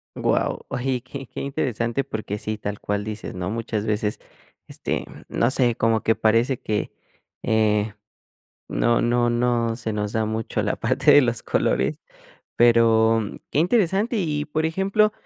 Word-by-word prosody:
Wao, - - 0
oye, 130 +1 -1
y 125 - -4
qué 135 +2 -8
qué - - -9
interesante 125 -2 -1
porque 105 -3 -4
sí, 110 +1 -4
tal 100 -1 -5
cual 105 0 -2
dices, 110 -2 -6
¿no?, 90 0 -4
muchas 110 -1 -3
veces, 105 -1 -1 0.5
este, - - -3 0.2
no 120 - +1
sé, 125 -3 +2
como 115 -1 +2
que 115 - +3
parece 115 +4 +2
que, 105 -1 -2 0.5
eh, 105 -1 +2 0.8
no 120 0 +2
no 120 0 +2
no 120 -1 +1
se 115 -2 -4
nos 105 0 -2
da 110 -1 0
mucho 110 +1 -2
la - - -1
parte - - +2
de 145 - +8
los 120 -3 0
colores, - - 0 0.6
pero, 115 -1 +5
mm, 105 - -5
qué 150 - +1
interesante 200 +4 +2
y, 150 -6 -1
por 155 +1 0
ejemplo, 195 +5 +2
115 Hz, 160 wpm, -23 LUFS, 110-135 Hz, 0.8 s, de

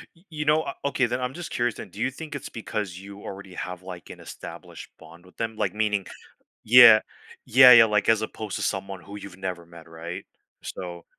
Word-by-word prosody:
Y 170 - -25
you 150 -1 -5
know, 150 +1 +4
uh, 140 - -5
okay 135 -2 +1
then, 120 - -2
I'm 125 +1 -3
just 175 +2 -8
curious 120 -1 -1
then, - - -9
do 105 - -13
you 130 +3 +1
think 150 +2 -9
it's 140 - -7
because 105 -5 -5
you 100 +1 -11
already 95 -1 -9
have, 90 0 -6
like, 90 -2 -10
an - - -10
established - - -10
bond 85 +2 -16
with 90 - -20
them, 115 -1 -3
like - - -1
meaning, 105 -2 0 0.6
yeah 115 -1 +9 0.4
yeah 125 +1 +8
yeah, 115 -2 +9
like, 105 -2 0
as 110 -1 +4
opposed 110 -1 -5
to - - -4
someone 95 -2 -3
who 100 +3 -10
you've 100 -3 -10
never 90 -3 -5
met, 85 -1 -14
right, 85 +2 -8 0.4
so 85 -2 -7
105 Hz, 215 wpm, -25 LUFS, 90-120 Hz, 0.6 s, yeah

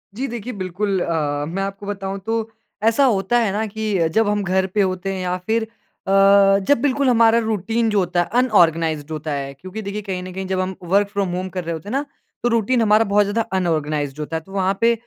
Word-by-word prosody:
जी 265 +5 -2
देखिए 240 0 -6
बिल्कुल 190 0 -2
अ, 145 -4 -1
मैं 190 +4 -3
आपको 195 +1 -6
बताऊँ 195 -1 -4
तो 225 0 -1 0.3
ऐसा 230 +5 +4
होता 225 -1 +2
है 225 -4 +1
ना 210 +3 -1
कि 210 -5 -1
जब 225 -1 +3
हम 205 0 0
घर 190 0 +1
पे 200 +2 0
होते 190 0 -1
हैं 190 - -4
या 180 0 -1
फ़िर 220 +5 -1
अ, 220 - -9 1.0
जब 285 -4 +4
बिल्कुल 280 -1 +2
हमारा 230 -1 +5
रूटीन 225 +1 0
जो 210 -2 +2
होता 175 -1 0
है। - - -1 0.2
अनऑर्गनाइज़्ड 165 - +2
होता 155 0 -4
है 140 -1 -4
क्योंकि 185 +9 -8
देखिए 200 +1 -4
कहीं 190 -3 -4
ना 185 - -7
कहीं 190 +1 -5
जब 190 0 -1
हम 185 0 -2 0.2
वर्क 200 0 +4
फ्रॉम 200 -2 -1
होम 185 +1 -3
कर 185 0 -4
रहे 170 0 -3
होते 160 +5 -7
हैं - - -5
ना 285 - 0 0.4
तो 240 - +2
रूटीन 230 +1 +2
हमारा 215 0 +4
बहुत 205 0 +5
ज़्यादा 205 +3 0 0.2
अनऑर्गनाइज़्ड 155 -4 -1
होता 150 +2 -4
है। - - -6
तो 195 - -17
वहाँ 195 0 0
पे 235 0 +5
195 Hz, 230 wpm, -21 LUFS, 180-220 Hz, 1.0 s, हमारा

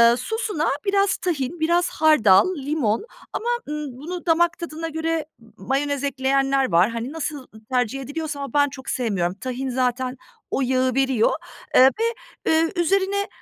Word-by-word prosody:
sosuna 340 - -2 0.2
biraz 395 0 +2
tahin, 325 -2 -2
biraz 345 +3 +2
hardal, 310 - +4
limon 275 - -1 0.3
ama, 475 - -2 0.2
ııı, 300 -1 -3
bunu 345 +6 -6
damak 345 +1 +3
tadına 330 -1 -5
göre 320 0 -2
m 225 -1 -19
mayonez 285 +2 -1
ekleyenler 270 -1 +1
var. 175 +5 +5
Hani, 235 +3 -4
nasıl 300 -4 -4 0.2
tercih 250 +1 0
ediliyorsa 290 +2 -4
ama 275 -3 -6
ben 285 0 +4
çok 270 -1 -9
sevmiyorum, 195 -8 0
tahin 255 +5 -4
zaten 255 0 -1 0.3
o - - 0
yağı 255 0 +1
veriyor, 265 -4 +3 0.4
eee, - - +8 0.2
ve, - - +1 0.5
eee, 320 +1 +3
üzerine, 390 +3 +1
285 Hz, 150 wpm, -23 LUFS, 255-330 Hz, 0.5 s, eee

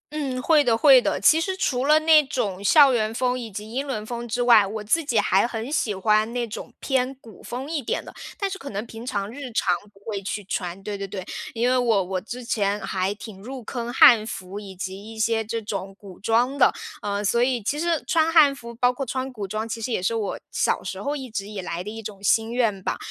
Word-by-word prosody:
嗯， 270 -4 -2
会 310 +3 +4
的 235 -5 +2
会 265 0 +7
的。 - - -1
其 320 - +6
实 375 +3 -1
除 260 -9 0
了 305 +2 +5
那 315 -1 +6
种 200 -9 -2
校 280 +7 +6
园 220 -3 0
风 255 0 0
以 235 -2 -6
及 210 +2 -8
英 270 +4 -3
伦 215 -6 -3
风 240 +1 -5
之 245 +2 -2
外， 230 -5 +6
我 215 +1 -5
自 315 +10 +1
己 240 -5 0
还 205 +1 +3
很 235 +2 -5
喜 230 -8 0
欢 215 +3 +2
那 245 -1 -1
种 235 +2 -8
偏 265 -1 0
古 220 -5 -14
风 260 +5 -6
一 315 -3 -1
点 235 - -2
的， - - -11 0.2
但 400 - -1
是 385 - -4
可 280 -6 -8
能 205 +2 -4
平 225 0 -10
常 205 -5 -3
日 275 +1 -7
常 185 -4 +2 0.2
不 195 - -22
会 205 -3 -3
去 205 +1 -4
穿， 185 -1 -4
对 205 0 -4
对 200 0 -5
对。 190 -2 -6 0.3
因 235 +2 +1
为 255 - +3
我 230 -6 +2
我 185 +1 -3
之 240 +6 -8
前 205 -4 0
还 190 -1 -1
挺 205 -2 -10
入 255 +3 -8
坑 240 +1 -4
汉 225 -4 +7
服， 195 -2 -6
以 195 -2 -10
及 190 +1 -6
一 - - -12
些 225 0 +1
这 225 +1 -3
种 195 -2 -5
古 195 -4 -13
装 235 +6 +1
的。 275 - +5 0.3
嗯， 205 0 -2
所 235 +4 +2
以 245 -2 +1
其 290 +8 -1
实 335 -2 0
穿 325 -3 +2
汉 300 -4 +7
服， 235 -3 -10
包 245 +1 +3
括 270 +2 -4
穿 260 +1 -3
古 210 -5 -6
装， 215 +3 -3
其 225 0 -5
实 235 +2 -2
也 180 - -1
是 215 - +1
我 220 -3 -2
小 - - 0
时 - - -5
候 285 +1 -2
一 265 -3 -6
直 200 -2 -4
以 210 -2 -6
来 175 -1 -4
的 195 - -6
一 225 +1 -7
种 205 -2 -8
心 225 +3 +2
愿 225 -6 0
吧。 - - -2
230 Hz, 270 characters per minute, -24 LUFS, 205-255 Hz, 0.3 s, 会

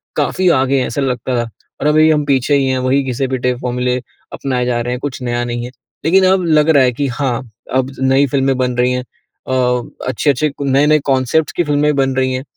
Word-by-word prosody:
काफ़ी 185 -1 +1
आगे 135 -2 +2
हैं, 130 - 0
ऐसा 140 - -3
लगता 125 -1 -2
था 115 - -8 0.3
और 150 - +1
अब 150 - +3 0.2
हम 150 -1 0
पीछे 140 0 +2
ही 135 -1 +2
हैं 130 0 0
वही 130 +2 +1
घिसे-पिटे 130 -1 -1
फ़ॉर्मूले 125 0 -1 0.4
अपनाए 125 -3 -2
जा 120 -1 0
रहे 120 +1 -2
हैं 125 - -4
कुछ 135 -2 -5
नया 120 -1 -2
नहीं 120 0 -4
है। 125 - -8 0.3
लेकिन 190 +3 +4
अब 190 -1 +2
लग 155 -1 +3
रहा 140 -4 +5
है 125 - +3
कि 140 +3 -2
हाँ, 125 -1 -2 0.3
अब 130 0 0
नई 135 +1 +3
फ़िल्में 135 0 +1
बन 125 -1 -1
रही 125 +1 +2
हैं 125 0 -2 0.4
अ, 130 - -2 0.5
अच्छे-अच्छे 145 +2 +1
क - - -13
नए-नए 145 +3 +3
कॉनसेप्ट्स 135 +3 +1
की 175 - 0
फ़िल्में 150 -1 +1
बन 135 -1 +1
रही 130 0 0
हैं। 130 +1 -3
130 Hz, 220 wpm, -16 LUFS, 125-145 Hz, 0.5 s, रहा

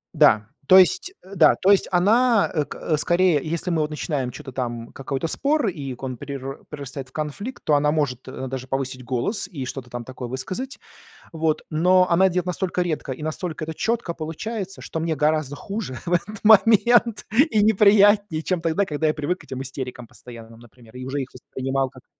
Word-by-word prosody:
Да. 110 -9 +5 0.2
То 185 - +9
есть 365 - +3
э 195 +2 -12
да. 165 - +6
То 195 +2 +5
есть 200 - +4
она, 220 +5 +3
э, 150 -3 0
к 155 +2 -2
скорее, 175 0 +3
если 170 +3 -3
мы 165 -3 +1
вот 150 0 -2
начинаем 145 -4 -2
чё-то 130 - -9
там 120 -2 -4
какой-то 135 +3 -3
спор, 285 - +1
и 145 -8 -4
к 125 - -14
он 130 -2 -4
перер 135 0 -7
перерастает 140 -2 -7
в - - -25
конфликт, 155 - -5
то 150 - +3
она 150 +1 +2
может 140 -5 -1
даже 130 0 -6
повысить 130 -1 -3
голос 130 - -2
и 150 -9 -6
что-то 125 -1 -7
там 120 -1 -5
такое 130 0 -7
высказать. 185 - -5 0.5
Вот. 160 -1 0
Но 180 +3 +3
она 190 +3 +4
делает 180 0 -2
настолько 180 0 -1
редко, 160 -5 -2
и 130 - -6
настолько 155 +1 -4
это 160 0 -6
четко 230 -4 -1
получается, 190 +5 -5
что 160 - -5
мне 160 0 -1
гораздо 150 -1 0
хуже 195 -6 -5
в 175 - -1
этот 205 +5 -2
момент 220 +2 +5 0.3
и 215 - +3
неприятнее, 205 -4 +4
чем 180 +1 -1
тогда, 165 +5 +1
когда 150 -2 -2
я 155 - +2
привык 155 +5 -3
к - - -16
этим 130 0 -6
истерикам 130 -2 -7
постоянным, 115 -1 -13
например, 120 +1 -18
и 125 - -7
уже 140 +2 -2
их 130 - -5
воспринимал, 135 +1 -3
как - - -16
155 Hz, 195 wpm, -23 LUFS, 130-190 Hz, 0.5 s, То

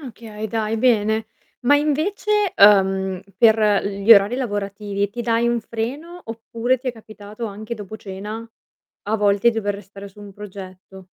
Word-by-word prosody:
Okay, 220 -5 -8
dai 220 0 -1
bene. 220 -2 +2 0.3
Ma 285 +4 +4
invece, 390 +7 0
uhm, 190 -2 +4
per 215 -2 +4
gli 200 +3 +5
orari 205 +3 +5
lavorativi, 205 -4 -3
ti 240 +3 -6
dai 235 0 +1
un 235 -1 +1
freno 275 +11 -5
oppure 230 +2 -2
ti 255 +1 -4
è - - -2
capitato 215 0 -10
anche 215 +3 -6
dopo 215 0 -8
cena 210 +3 -7 0.6
a 215 +2 0
volte 205 +2 +3
dover 205 -3 -2
restare 200 0 -11
su 200 +2 -17
un 200 -1 -10
progetto? 190 -1 -11
215 Hz, 150 wpm, -21 LUFS, 200-235 Hz, 0.6 s, gli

